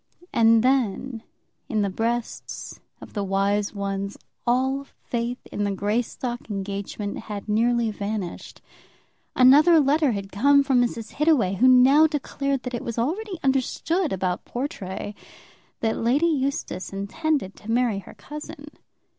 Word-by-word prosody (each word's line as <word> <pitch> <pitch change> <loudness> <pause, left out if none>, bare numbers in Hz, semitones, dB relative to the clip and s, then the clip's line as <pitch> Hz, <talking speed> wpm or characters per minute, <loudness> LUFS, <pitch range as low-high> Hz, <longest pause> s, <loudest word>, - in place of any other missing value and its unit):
And 225 -1 +5
then, 255 -2 0 0.5
in 215 -2 +1
the 200 - 0
breasts 230 +4 -3 0.2
of - - -11
the 205 - -2
wise 200 +2 0
ones, 200 0 -3 0.3
all 265 +3 +1
faith 240 -2 -4
in 205 - -2
the 205 - 0
Greystock 240 +4 -2
engagement 200 0 -4
had 205 -1 -5
nearly 230 +1 +2
vanished. 205 -3 -5 0.7
Another 295 +6 +7
letter 290 -1 +3
had 195 -1 -5
come 280 +6 +4
from 265 -3 +3
Mrs. 235 -2 -2
Hittaway, 290 - +2
who 255 - +5
now 260 +5 +7
declared 280 -3 -2
that 250 - -5
it 240 - -3
was 235 -1 -5
already 365 - -2
understood 275 +6 0
about 185 -1 -1
Portray 205 -6 -5 0.7
that 225 -1 0
Lady 255 +8 +2
Eustace 275 - -1
intended 200 - -2
to 215 - -12
marry 235 -3 +1
her 195 - -13
cousin. 300 0 -9
240 Hz, 135 wpm, -24 LUFS, 205-275 Hz, 0.7 s, Another